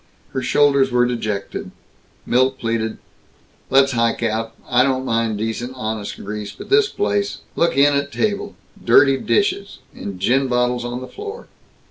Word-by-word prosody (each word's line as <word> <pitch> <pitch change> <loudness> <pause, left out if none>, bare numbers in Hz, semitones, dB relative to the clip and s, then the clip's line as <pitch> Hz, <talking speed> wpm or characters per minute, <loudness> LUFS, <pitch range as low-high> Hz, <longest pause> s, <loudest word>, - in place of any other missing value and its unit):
Her 130 - -2
shoulders 140 0 +3
were 125 0 +3
dejected. 110 -5 -3 0.6
Milt 130 +2 +2
pleaded, 115 -2 -2 0.7
"Let's 135 0 +5
hike 115 -1 0
out. 115 0 -2
I 125 -1 +4
don't 130 0 +1
mind 115 -3 0
decent 115 +4 -3
honest 110 -4 -4
grease, 105 0 -6
but - - -12
this 420 0 +5
place 100 0 -1
look 170 -4 +1
in 145 +1 +5
at 140 0 -1
table! 205 +2 -1 0.3
Dirty 135 -1 +5
dishes 400 - 0 0.2
And 100 -2 -7
gin 130 +8 +2
bottles 125 -1 +1
on 120 +1 -4
the 130 - -7
floor!" 420 +2 -8
125 Hz, 150 wpm, -20 LUFS, 110-135 Hz, 0.7 s, Let's